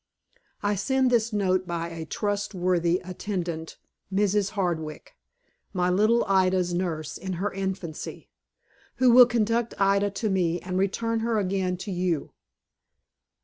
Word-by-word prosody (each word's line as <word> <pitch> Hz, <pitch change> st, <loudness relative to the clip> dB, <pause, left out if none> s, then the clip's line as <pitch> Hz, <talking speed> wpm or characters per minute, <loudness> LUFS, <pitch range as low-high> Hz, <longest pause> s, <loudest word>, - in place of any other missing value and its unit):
I 205 Hz, 0 st, +2 dB
send 260 Hz, +5 st, +1 dB
this 230 Hz, -1 st, +2 dB
note 185 Hz, -3 st, +1 dB
by 170 Hz, -1 st, -3 dB
a 165 Hz, -1 st, -7 dB
trustworthy 185 Hz, -3 st, 0 dB
attendant, 175 Hz, -3 st, -4 dB, 0.3 s
Mrs. 200 Hz, 0 st, +2 dB
Hardwick, 165 Hz, -, -3 dB, 0.6 s
my 180 Hz, -1 st, +1 dB
little 215 Hz, +5 st, +3 dB
Ida's 185 Hz, -2 st, +2 dB
nurse 170 Hz, -4 st, -3 dB
in 190 Hz, +1 st, -4 dB
her 195 Hz, +4 st, -2 dB
infancy, 190 Hz, -4 st, -5 dB, 0.7 s
who 255 Hz, -1 st, +4 dB
will 250 Hz, 0 st, +9 dB
conduct 235 Hz, 0 st, 0 dB
Ida 200 Hz, +1 st, +3 dB
to 205 Hz, +2 st, -2 dB
me, 175 Hz, -2 st, +1 dB
and 185 Hz, +1 st, -3 dB
return 230 Hz, +4 st, 0 dB
her 225 Hz, 0 st, 0 dB
again 190 Hz, -2 st, 0 dB
to 195 Hz, +3 st, -6 dB
you. 175 Hz, -4 st, -1 dB
190 Hz, 130 wpm, -26 LUFS, 175-210 Hz, 0.7 s, will